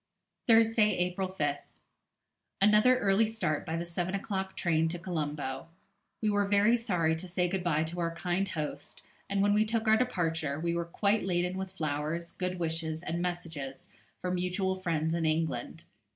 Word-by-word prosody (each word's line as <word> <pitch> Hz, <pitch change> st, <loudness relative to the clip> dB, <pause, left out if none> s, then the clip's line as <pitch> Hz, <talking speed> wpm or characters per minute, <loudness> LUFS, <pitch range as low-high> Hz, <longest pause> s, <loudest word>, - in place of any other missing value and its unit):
Thursday, 225 Hz, -3 st, +5 dB
April 180 Hz, +1 st, -1 dB
5th. 145 Hz, -6 st, -1 dB, 1.0 s
Another 210 Hz, +5 st, +6 dB
early 205 Hz, 0 st, +3 dB
start 180 Hz, -10 st, -2 dB
by 160 Hz, +1 st, -1 dB
the 170 Hz, -, -3 dB
seven 175 Hz, +2 st, -2 dB
o'clock 190 Hz, -1 st, -3 dB
train 165 Hz, -2 st, +2 dB
to 175 Hz, -, -3 dB
Colombo. 150 Hz, -5 st, -3 dB, 0.6 s
We 215 Hz, -, +3 dB
were 205 Hz, -1 st, +2 dB
very 205 Hz, +3 st, +4 dB
sorry 175 Hz, -9 st, +1 dB
to 165 Hz, +3 st, -7 dB
say 180 Hz, 0 st, 0 dB
good 185 Hz, 0 st, -2 dB
bye 160 Hz, -3 st, +2 dB
to 165 Hz, +2 st, -5 dB
our 165 Hz, -1 st, -1 dB
kind 185 Hz, +3 st, -1 dB
host, 155 Hz, -5 st, -5 dB, 0.3 s
and 195 Hz, 0 st, +1 dB
when 205 Hz, 0 st, +4 dB
we 210 Hz, +1 st, +4 dB
took 220 Hz, 0 st, -1 dB
our 220 Hz, 0 st, +6 dB
departure, 160 Hz, -, -1 dB
we 170 Hz, +1 st, 0 dB
were 170 Hz, 0 st, -1 dB
quite 200 Hz, +5 st, +1 dB
laden 180 Hz, 0 st, 0 dB
with 190 Hz, 0 st, -5 dB
flowers, 155 Hz, 0 st, -2 dB
good 180 Hz, 0 st, -3 dB
wishes, 160 Hz, -1 st, -2 dB
and 170 Hz, +1 st, -2 dB
messages 165 Hz, -7 st, -5 dB, 0.3 s
for 180 Hz, -, -2 dB
mutual 180 Hz, +1 st, 0 dB
friends 165 Hz, -3 st, -1 dB
in 170 Hz, -1 st, 0 dB
England. 155 Hz, -2 st, -1 dB
175 Hz, 170 wpm, -30 LUFS, 160-195 Hz, 1.0 s, Another